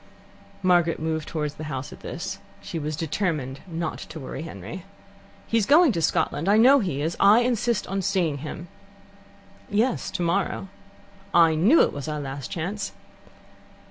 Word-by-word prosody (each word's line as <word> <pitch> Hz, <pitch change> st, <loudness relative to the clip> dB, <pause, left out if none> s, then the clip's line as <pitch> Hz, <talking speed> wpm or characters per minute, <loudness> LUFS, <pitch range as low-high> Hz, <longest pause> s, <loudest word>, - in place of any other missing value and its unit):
Margaret 175 Hz, -2 st, +3 dB
moved 160 Hz, 0 st, -2 dB
towards 150 Hz, -2 st, -3 dB
the 155 Hz, -, -8 dB
house 135 Hz, -3 st, -5 dB
at -, -, -13 dB
this. -, -, -6 dB, 0.2 s
She 165 Hz, -, -5 dB
was 155 Hz, 0 st, -3 dB
determined 155 Hz, -4 st, -2 dB
not 165 Hz, -2 st, -4 dB
to 160 Hz, -, -8 dB
worry 135 Hz, 0 st, -6 dB
Henry. 160 Hz, -, -8 dB, 0.6 s
"He's 225 Hz, -3 st, +1 dB
going 310 Hz, 0 st, +6 dB
to 170 Hz, -, -2 dB
Scotland. 160 Hz, +2 st, 0 dB
I 205 Hz, -, +5 dB
know 265 Hz, +5 st, +7 dB
he 145 Hz, -, -2 dB
is. 165 Hz, +2 st, -1 dB
I 210 Hz, +4 st, +6 dB
insist 240 Hz, -1 st, 0 dB
on 195 Hz, +1 st, -2 dB
seeing 180 Hz, -6 st, 0 dB
him." 155 Hz, +4 st, -7 dB, 1.0 s
"Yes, 225 Hz, +5 st, 0 dB
tomorrow." 185 Hz, +2 st, -1 dB, 0.7 s
"I 165 Hz, -2 st, +6 dB
knew 200 Hz, -, +5 dB
it -, -, 0 dB
was 140 Hz, +1 st, -6 dB
our 150 Hz, -1 st, -3 dB
last 135 Hz, -2 st, -6 dB
chance." 195 Hz, +5 st, -4 dB
170 Hz, 155 wpm, -25 LUFS, 150-200 Hz, 1.0 s, know